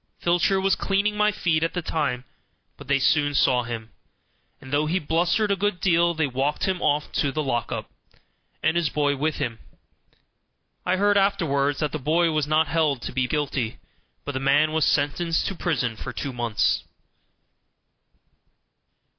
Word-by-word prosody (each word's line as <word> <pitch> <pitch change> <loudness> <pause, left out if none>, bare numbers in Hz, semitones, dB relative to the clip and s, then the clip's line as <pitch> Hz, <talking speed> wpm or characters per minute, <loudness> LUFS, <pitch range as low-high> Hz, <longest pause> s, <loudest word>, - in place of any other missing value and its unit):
Filcher 175 +3 +2
was 195 0 +2
cleaning 200 +2 0
my 210 0 +3
feet 165 -6 0
at 165 - -1
the 175 - -1
time, 140 -7 -1 0.5
but 145 - -13
they 140 +1 +3
soon 145 +1 +2
saw 125 -2 +3
him, 115 -2 -6 0.7
and 130 +1 -10
though 150 +1 +2
he 170 +4 +1
blustered 175 +6 +1
a - - +3
good 195 -1 -1
deal 170 -1 +2
they 160 -1 +1
walked 135 +2 -1
him 190 -2 -1
off 150 0 0
to 140 - 0
the 155 +2 -2
"lock 120 -5 -2
up", - - -4 0.8
and 160 +1 +2
his 170 -3 +1
boy 145 -1 +1
with 155 +3 -1
him. 120 -6 -3 1.3
I 180 - +3
heard 205 +1 +3
afterward 160 -8 +1
that 150 -2 -1
the 155 - -3
boy 165 +4 +2
was 155 -2 0
not 155 +1 +3
held 150 -6 0
to - - -4
be 130 0 0
guilty, 135 -5 -2 0.5
but 145 - -3
the 130 - -3
man 145 +3 +3
was 160 -1 +2
sentenced 165 +3 +1
to - - -2
prison 125 -10 -1
for - - -6
two 140 - -5
months. 110 - 0
155 Hz, 170 wpm, -24 LUFS, 135-175 Hz, 1.3 s, my